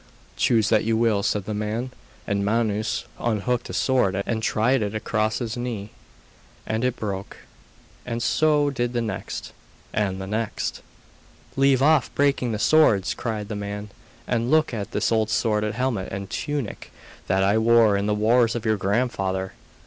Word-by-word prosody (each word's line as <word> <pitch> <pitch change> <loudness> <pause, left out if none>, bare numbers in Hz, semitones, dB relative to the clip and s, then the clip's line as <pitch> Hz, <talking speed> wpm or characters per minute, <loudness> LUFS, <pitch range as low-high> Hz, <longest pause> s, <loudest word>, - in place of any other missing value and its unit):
'Choose 110 -3 +2
what - - +4
you 110 0 +1
will,' 110 -3 +2
said 100 -1 -1
the 110 - -3
man; 110 +4 -3 0.3
and 100 -1 -1
Manus 110 0 0
unhooked 120 +1 -1
a - - -5
sword 125 -8 +2
and 110 -1 -1
tried 115 +4 +2
it 105 0 -2
across 110 0 0
his 115 -3 -3
knee, 115 -4 -4 0.7
and 110 +2 -2
it 125 -1 +1
broke, 100 -4 -5 0.7
and 115 -1 -3
so 145 +4 +3
did 120 -2 -2
the 120 - 0
next, 110 - -5 0.4
and 95 -3 -1
the 95 - -5
next. 110 +2 -3 0.7
'Leave 135 -1 +3
off 150 -3 +4
breaking 140 -4 +2
the 110 - -1
swords,' 110 -7 +4
cried 110 -3 -4
the 105 - -4
man, 105 +1 -5 0.4
'and 120 0 0
look 155 -2 +3
at 105 -3 -4
this - - 0
old 110 -1 +2
sword 110 -1 +1
and 105 - -2
helmet 120 -6 -1
and 100 0 -6
tunic 145 -7 -4 0.4
that 95 +1 +2
I 100 +3 +3
wore 115 -2 +5
in 100 +1 0
the 105 - +1
wars 115 +2 +3
of 120 -1 -4
your 110 -1 +2
grandfather. 95 -2 -1
110 Hz, 170 wpm, -24 LUFS, 105-120 Hz, 0.7 s, wore